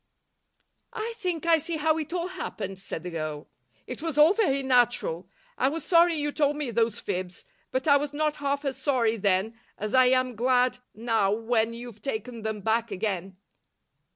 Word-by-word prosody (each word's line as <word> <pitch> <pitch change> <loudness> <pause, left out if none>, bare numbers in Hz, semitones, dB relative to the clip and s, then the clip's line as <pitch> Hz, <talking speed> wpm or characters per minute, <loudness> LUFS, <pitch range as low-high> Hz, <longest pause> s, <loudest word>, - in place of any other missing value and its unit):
"I 460 +1 -4
think 360 -6 -3
I 330 -1 +5
see 325 +2 -3
how 315 +1 +2
it 310 0 -5
all 355 0 -2
happened," 200 - -6
said 175 -4 -6
the 180 - -5
girl. 155 -2 -5 0.3
"It - - -7
was 325 -3 -3
all 305 +5 +7
very 275 -11 +1
natural. 240 -9 +1 0.3
I 260 - +3
was 320 +3 -5
sorry 340 -1 +5
you 295 -1 -1
told 290 -1 +1
me 290 -5 -3
those 230 -1 +1
fibs, 185 -2 -4 0.2
but 260 +3 -2
I 285 -1 +7
was 285 0 -3
not 300 0 -1
half 280 0 -2
as 270 -1 -2
sorry 235 -6 +1
then 200 +3 0 0.2
as 210 0 -4
I 255 -1 +6
am 255 -1 +2
glad 250 +2 +2 0.2
now 220 -3 +1
when 225 +1 0
you've 235 -3 -9
taken 230 -1 -4
them 220 -1 -3
back 225 +3 0
again." 190 -2 -3
250 Hz, 180 wpm, -27 LUFS, 220-295 Hz, 0.3 s, all